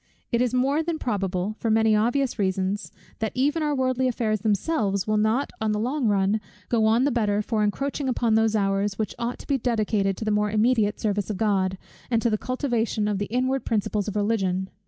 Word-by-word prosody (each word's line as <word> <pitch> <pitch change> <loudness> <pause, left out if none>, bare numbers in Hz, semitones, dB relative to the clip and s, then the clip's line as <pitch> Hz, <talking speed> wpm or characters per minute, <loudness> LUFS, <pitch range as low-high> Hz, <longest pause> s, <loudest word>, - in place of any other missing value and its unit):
It 235 -1 +2
is 250 -2 +1
more 270 +5 +2
than 330 0 -2
probable, 195 -5 -2
for 230 - -1
many 220 0 +4
obvious 240 +4 +1
reasons, 190 +1 -1 0.3
that 220 -1 -1
even 290 +5 +1
our 300 -1 0
worldly 260 -1 +1
affairs 220 -3 0
themselves 205 - 0
will 215 - 0
not 220 +6 +1
on 215 -1 +1
the 210 - -1
long 255 +3 0
run, 200 +1 +2 0.3
go 225 -2 +2
on 230 +3 +3
the 285 - +2
better 210 -3 +1
for 215 -1 0
encroaching 275 +6 -1
upon 235 -2 +1
those 220 0 +3
hours, 195 -1 0
which 215 -3 -2
ought 235 +1 -2
to - - -12
be 275 -2 +1
dedicated 215 -5 0
to 220 - -5
the 215 - +1
more 210 0 +1
immediate 215 0 +2
service 205 -2 -1
of 210 - -2
God, 190 -3 +1 0.3
and 230 -2 +2
to 235 0 +1
the 215 - +2
cultivation 240 -4 -1
of 205 -2 -1
the 205 - -2
inward 255 +3 0
principles 210 -1 -1
of 210 - -4
Religion. 195 -3 0
220 Hz, 210 wpm, -25 LUFS, 205-250 Hz, 0.3 s, many